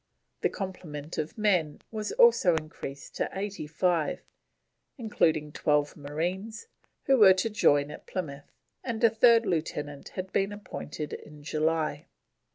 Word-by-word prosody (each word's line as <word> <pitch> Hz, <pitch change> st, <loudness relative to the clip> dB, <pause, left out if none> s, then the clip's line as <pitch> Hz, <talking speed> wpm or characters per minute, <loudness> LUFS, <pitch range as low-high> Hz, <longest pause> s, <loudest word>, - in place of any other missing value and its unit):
The -, -, +2 dB
complement 165 Hz, -6 st, -6 dB
of 155 Hz, +6 st, -4 dB
men 180 Hz, -8 st, +1 dB
was 215 Hz, -2 st, -3 dB
also 470 Hz, -, +5 dB
increased 150 Hz, -3 st, -6 dB
to -, -, 0 dB
85, 175 Hz, -4 st, -1 dB, 0.7 s
including 160 Hz, -, +1 dB
12 150 Hz, 0 st, +1 dB
marines 175 Hz, -, -4 dB, 0.4 s
who 270 Hz, -1 st, +4 dB
were 190 Hz, -3 st, +8 dB
to 220 Hz, +4 st, -1 dB
join 145 Hz, -8 st, +3 dB
at -, -, -11 dB
Plymouth, 145 Hz, -6 st, -5 dB, 0.3 s
and 235 Hz, -2 st, -3 dB
a 230 Hz, -, +7 dB
third 230 Hz, +1 st, +5 dB
Lieutenant 150 Hz, -4 st, -3 dB
had 185 Hz, 0 st, -5 dB
been 195 Hz, +1 st, +1 dB
appointed 175 Hz, -7 st, -6 dB
in 150 Hz, -1 st, -10 dB
July. 155 Hz, -1 st, -1 dB
170 Hz, 130 wpm, -28 LUFS, 150-205 Hz, 0.7 s, were